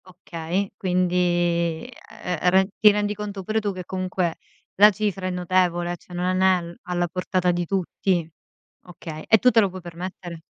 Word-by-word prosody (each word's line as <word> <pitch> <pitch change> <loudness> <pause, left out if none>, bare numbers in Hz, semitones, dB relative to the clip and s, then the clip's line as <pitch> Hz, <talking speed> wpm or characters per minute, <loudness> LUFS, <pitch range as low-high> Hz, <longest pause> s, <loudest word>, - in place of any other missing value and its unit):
Okay, 180 +1 -4
quindi, 175 -1 +1 0.2
uhm, 180 -5 -1
re 190 +1 +3
ti 210 - +8
rendi 205 0 0
conto 205 -2 -6
pure 220 +3 0
tu 205 -2 -2
che, 185 -2 -7
comunque, 185 -2 -2 0.4
la 205 +2 +8
cifra 200 -2 -2
è - - -1
notevole, 180 -1 0
cioè, 180 - -16
non 180 +1 0
è 180 -3 +2
alla 175 -2 -1
portata 180 +1 0
di 175 0 -1
tutti. 185 -2 -1 0.6
Okay. 165 -3 -9
E 220 - +6
tu 250 +3 +4
te 230 - +5
lo 200 - +2
puoi 185 0 -9
permettere? 175 0 -8
180 Hz, 165 wpm, -23 LUFS, 175-195 Hz, 0.6 s, ti